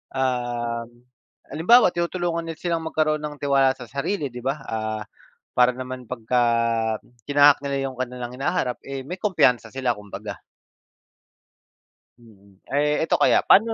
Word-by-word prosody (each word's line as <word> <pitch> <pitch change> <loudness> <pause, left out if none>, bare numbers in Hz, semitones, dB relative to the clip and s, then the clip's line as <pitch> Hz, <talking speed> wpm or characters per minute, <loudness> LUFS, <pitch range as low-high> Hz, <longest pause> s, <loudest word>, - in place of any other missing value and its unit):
Um, 120 -2 -2 0.5
halimbawa, 185 +6 +5
tinutulungan 170 -1 -2
nila 165 - -5
silang 165 -2 -1
magkaroon 155 -1 +1
ng 150 0 -5
tiwala 135 -2 +3
sa 125 -4 -11
sarili, 140 0 -2
'di 125 - -7
ba? 135 +3 -1
Ah, 110 -1 -3 0.5
para 125 0 +3
naman 130 -1 -7
pagka 125 +1 0 0.9
tinahak 145 0 +6
nila 140 -1 -2
'yong 130 - -15
kanilang 125 -1 -4
hinaharap, 135 -4 -1
eh, 135 -1 -5
may 180 +7 -7
kumpiyansa 170 - +2
sila 130 -2 -1
kumbaga. 105 -1 -7 1.8
Mm. 100 -4 -21 0.2
Eh, 150 +2 +2
eto - - +3
kaya, - - +4
pa'no 225 +3 +6
130 Hz, 135 wpm, -23 LUFS, 120-155 Hz, 1.8 s, tinahak